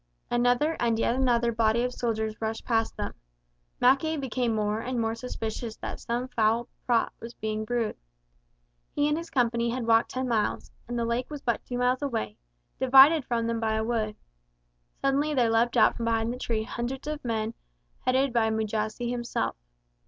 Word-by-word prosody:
Another 245 Hz, +6 st, +2 dB
and 230 Hz, -2 st, +2 dB
yet 230 Hz, -, +2 dB
another 240 Hz, -2 st, +2 dB
body 225 Hz, +1 st, +2 dB
of 250 Hz, 0 st, -1 dB
soldiers 220 Hz, -3 st, -2 dB
rushed 220 Hz, 0 st, -3 dB
past 225 Hz, -2 st, 0 dB
them. -, -, -3 dB, 0.7 s
Mackay 290 Hz, +5 st, +3 dB
became 250 Hz, -4 st, -1 dB
more 210 Hz, 0 st, 0 dB
and 250 Hz, +1 st, -3 dB
more 225 Hz, -1 st, 0 dB
suspicious 225 Hz, -1 st, -5 dB
that -, -, -6 dB
some 240 Hz, +2 st, -2 dB
foul 230 Hz, 0 st, +1 dB, 0.2 s
plot 235 Hz, -2 st, +2 dB
was 230 Hz, +1 st, -9 dB
being 215 Hz, 0 st, -3 dB
brewed. 235 Hz, -1 st, -1 dB, 1.0 s
He 290 Hz, 0 st, +2 dB
and 300 Hz, -, +2 dB
his 335 Hz, +2 st, -5 dB
company 235 Hz, -2 st, +1 dB
had 240 Hz, 0 st, -2 dB
walked 225 Hz, 0 st, +4 dB
ten 255 Hz, 0 st, -2 dB
miles, 225 Hz, -3 st, -1 dB, 0.2 s
and 240 Hz, 0 st, -3 dB
the 235 Hz, -, 0 dB
lake 235 Hz, +2 st, -1 dB
was 295 Hz, -2 st, -7 dB
but 235 Hz, -2 st, 0 dB
two 245 Hz, -, -4 dB
miles 250 Hz, +2 st, +1 dB
away, 170 Hz, -, -3 dB, 0.4 s
divided 270 Hz, +3 st, +7 dB
from 230 Hz, -1 st, -1 dB
them 230 Hz, 0 st, -1 dB
by 220 Hz, -1 st, 0 dB
a 220 Hz, -, 0 dB
wood. 220 Hz, -2 st, -1 dB, 0.9 s
Suddenly 285 Hz, +2 st, +1 dB
there 240 Hz, -3 st, +3 dB
leapt 230 Hz, +1 st, +2 dB
out -, -, +5 dB
from 230 Hz, -, -3 dB
behind 230 Hz, 0 st, +1 dB
the 250 Hz, -, -8 dB
trees 230 Hz, -3 st, -1 dB
of -, -, -8 dB
the -, -, -2 dB
wood 240 Hz, -, -1 dB
hundreds 270 Hz, +2 st, -7 dB
of 300 Hz, 0 st, -4 dB
men 225 Hz, -2 st, -1 dB, 0.5 s
headed 260 Hz, 0 st, +1 dB
by 225 Hz, -2 st, +3 dB
Mujasi 220 Hz, +2 st, -2 dB
himself. 240 Hz, -1 st, -2 dB
235 Hz, 190 wpm, -27 LUFS, 225-255 Hz, 1.0 s, divided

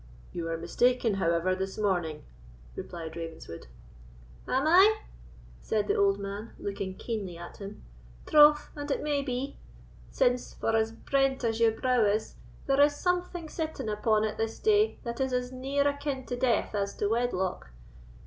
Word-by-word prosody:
"You 165 Hz, -1 st, -3 dB
are 165 Hz, -, -1 dB
mistaken, 235 Hz, +7 st, +2 dB
however, 170 Hz, -1 st, +1 dB
this 190 Hz, +1 st, -4 dB
morning," 175 Hz, -7 st, -1 dB, 0.5 s
replied 165 Hz, -2 st, -7 dB
Ravenswood. 165 Hz, -, -8 dB, 0.8 s
"Am 265 Hz, +3 st, +1 dB
I?" 390 Hz, +7 st, +6 dB, 0.6 s
said 210 Hz, -2 st, -1 dB
the -, -, +2 dB
old 200 Hz, 0 st, +3 dB
man, 200 Hz, +2 st, -6 dB
looking 195 Hz, -2 st, -4 dB
keenly 200 Hz, -7 st, -4 dB
at 175 Hz, -, -10 dB
him, 200 Hz, +1 st, -9 dB, 0.4 s
"troth 295 Hz, 0 st, +6 dB
and 290 Hz, 0 st, -6 dB
it 280 Hz, -, -1 dB
may 295 Hz, -2 st, +1 dB
be; 270 Hz, +1 st, -4 dB, 0.5 s
since, 250 Hz, -1 st, 0 dB
for 225 Hz, -, 0 dB
as 220 Hz, 0 st, +2 dB
brent 270 Hz, +3 st, 0 dB
as 225 Hz, -1 st, 0 dB
your 225 Hz, -1 st, +3 dB
brow 250 Hz, -2 st, +3 dB
is, 210 Hz, +1 st, 0 dB, 0.3 s
there 275 Hz, +1 st, +3 dB
is 290 Hz, 0 st, +5 dB
something 355 Hz, 0 st, -1 dB
sitting 315 Hz, -8 st, -4 dB
upon 215 Hz, 0 st, +2 dB
it 215 Hz, -1 st, -2 dB
this 225 Hz, 0 st, -2 dB
day 430 Hz, 0 st, +3 dB
that 235 Hz, +1 st, -4 dB
is 265 Hz, -1 st, 0 dB
as 250 Hz, 0 st, -1 dB
near 275 Hz, +2 st, 0 dB
akin 285 Hz, -2 st, -2 dB
to 245 Hz, -, -3 dB
death 245 Hz, -3 st, +1 dB
as 200 Hz, -1 st, -2 dB
to 205 Hz, -, 0 dB
wedlock. 205 Hz, -, -1 dB
230 Hz, 160 wpm, -29 LUFS, 200-275 Hz, 0.8 s, I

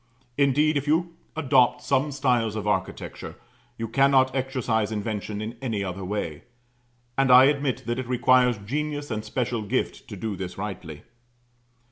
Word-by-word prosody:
Indeed, 145 Hz, +2 st, +3 dB
if 140 Hz, +1 st, -3 dB
you 165 Hz, +3 st, +1 dB, 0.2 s
adopt 130 Hz, -5 st, +3 dB
some 145 Hz, +3 st, +1 dB
styles 125 Hz, -6 st, +1 dB
of 110 Hz, -, -4 dB
architecture, 95 Hz, -3 st, -3 dB, 0.4 s
you 115 Hz, -, -3 dB
cannot 135 Hz, +1 st, +3 dB
exercise 125 Hz, -5 st, -1 dB
invention 105 Hz, -1 st, -3 dB
in 115 Hz, +2 st, -6 dB
any 110 Hz, -6 st, -2 dB
other 95 Hz, 0 st, -5 dB
way. 90 Hz, -6 st, -4 dB, 0.7 s
And 135 Hz, -1 st, +3 dB
I 125 Hz, +1 st, +9 dB
admit 140 Hz, -1 st, +1 dB
that 120 Hz, +1 st, -2 dB
it 130 Hz, -, -4 dB
requires 125 Hz, -1 st, +3 dB
genius 145 Hz, +6 st, -4 dB
and 110 Hz, -1 st, -2 dB
special 120 Hz, +1 st, -2 dB
gift 105 Hz, -, -2 dB
to -, -, -7 dB
do 110 Hz, -3 st, -4 dB
this 90 Hz, -1 st, -6 dB
rightly. 95 Hz, -7 st, -6 dB
125 Hz, 150 wpm, -25 LUFS, 105-135 Hz, 0.7 s, I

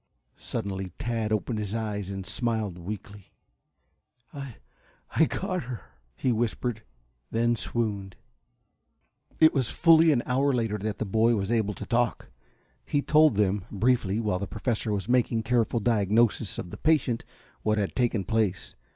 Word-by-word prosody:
Suddenly 95 Hz, -2 st, -4 dB
Tad 115 Hz, -4 st, -2 dB
opened 110 Hz, +1 st, -1 dB
his 105 Hz, 0 st, -3 dB
eyes, 105 Hz, -3 st, -3 dB
and 95 Hz, -1 st, -5 dB
smiled 110 Hz, -7 st, -1 dB
weakly. 100 Hz, +1 st, -8 dB, 1.0 s
"I 135 Hz, -5 st, -7 dB, 0.6 s
I 160 Hz, -, +5 dB
got 185 Hz, -, -3 dB
her," 120 Hz, -3 st, -6 dB, 0.3 s
he 130 Hz, -, 0 dB
whispered, 115 Hz, 0 st, -1 dB, 0.5 s
then 120 Hz, +1 st, +2 dB
swooned. 105 Hz, -5 st, -3 dB, 1.2 s
It 160 Hz, 0 st, +7 dB
was 130 Hz, -5 st, 0 dB
fully 165 Hz, -1 st, +5 dB
an 120 Hz, -5 st, +2 dB
hour 135 Hz, +2 st, +2 dB
later 115 Hz, -4 st, 0 dB
that 105 Hz, +1 st, -3 dB
the -, -, -2 dB
boy 110 Hz, +4 st, +3 dB
was 100 Hz, +1 st, -2 dB
able 110 Hz, -3 st, +1 dB
to -, -, -7 dB
talk. 120 Hz, -1 st, 0 dB, 0.5 s
He 145 Hz, -1 st, 0 dB
told 155 Hz, -5 st, +5 dB
them, 100 Hz, -1 st, +1 dB
briefly, 110 Hz, -1 st, +1 dB
while 105 Hz, -5 st, 0 dB
the 100 Hz, -, -4 dB
Professor 110 Hz, 0 st, -2 dB
was 100 Hz, -1 st, -2 dB
making 120 Hz, -2 st, +2 dB
a -, -, -10 dB
careful 120 Hz, -1 st, +1 dB
diagnosis 110 Hz, 0 st, +2 dB
of 90 Hz, -, -6 dB
the -, -, -7 dB
patient, 145 Hz, -7 st, +1 dB, 0.4 s
what 110 Hz, 0 st, +1 dB
had 100 Hz, -2 st, -1 dB
taken 120 Hz, -5 st, +1 dB
place. 105 Hz, -2 st, -1 dB
110 Hz, 150 wpm, -27 LUFS, 100-120 Hz, 1.2 s, It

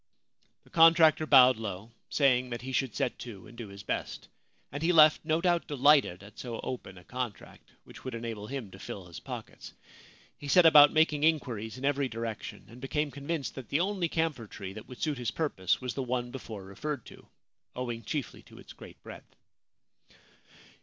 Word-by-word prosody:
The -, -, -23 dB
contractor 165 Hz, -1 st, +6 dB
bowed 130 Hz, -3 st, +7 dB
low, 110 Hz, 0 st, -6 dB, 0.2 s
saying 125 Hz, -3 st, +2 dB
that 120 Hz, 0 st, -5 dB
he 130 Hz, -, -5 dB
should 130 Hz, -3 st, -1 dB
set 125 Hz, -, -2 dB
to 110 Hz, -6 st, -9 dB
and 110 Hz, -, -14 dB
do 115 Hz, -2 st, -7 dB
his 100 Hz, 0 st, -11 dB
best; -, -, -4 dB, 0.4 s
and 145 Hz, +2 st, -5 dB
he 165 Hz, +2 st, +2 dB
left, 155 Hz, -3 st, +6 dB
no 160 Hz, +1 st, 0 dB
doubt, 175 Hz, -1 st, +1 dB
delighted 140 Hz, -, +3 dB
at 105 Hz, +2 st, -14 dB
so 120 Hz, -2 st, -5 dB
open 105 Hz, -7 st, -6 dB
a 90 Hz, -, -14 dB
contract, 125 Hz, +2 st, -7 dB
which -, -, -14 dB
would 130 Hz, -2 st, -5 dB
enable 115 Hz, -3 st, -6 dB
him 130 Hz, -6 st, -6 dB
to 95 Hz, -, -12 dB
fill 95 Hz, -1 st, -7 dB
his 85 Hz, -2 st, -10 dB
pockets. -, -, -9 dB, 0.7 s
He 145 Hz, -, -8 dB
set 175 Hz, +4 st, +6 dB
about 145 Hz, -2 st, +9 dB
making 155 Hz, -2 st, +2 dB
inquiries 125 Hz, -9 st, 0 dB
in 130 Hz, -, -5 dB
every 140 Hz, -1 st, +1 dB
direction, 115 Hz, -2 st, -6 dB
and 120 Hz, +2 st, -14 dB
became 150 Hz, +2 st, -1 dB
convinced 140 Hz, +1 st, -4 dB
that 130 Hz, -6 st, -9 dB
the 140 Hz, -, +1 dB
only 185 Hz, -3 st, -1 dB
camphor 155 Hz, -9 st, -1 dB
tree 95 Hz, -2 st, -8 dB
that 110 Hz, +1 st, -10 dB
would 125 Hz, -, -11 dB
suit 150 Hz, -4 st, -1 dB
his 120 Hz, -, -1 dB
purpose 100 Hz, -, -1 dB
was 125 Hz, -2 st, -3 dB
the 135 Hz, -, -3 dB
one 125 Hz, -1 st, -2 dB
before 110 Hz, -6 st, -8 dB
referred 145 Hz, +10 st, -5 dB
to -, -, -14 dB, 0.2 s
— -, -, -47 dB
owing 120 Hz, -2 st, -4 dB
chiefly 140 Hz, +3 st, -4 dB
to -, -, -17 dB
its -, -, -13 dB
great -, -, -14 dB
breadth. -, -, -12 dB
130 Hz, 195 wpm, -29 LUFS, 115-150 Hz, 0.7 s, about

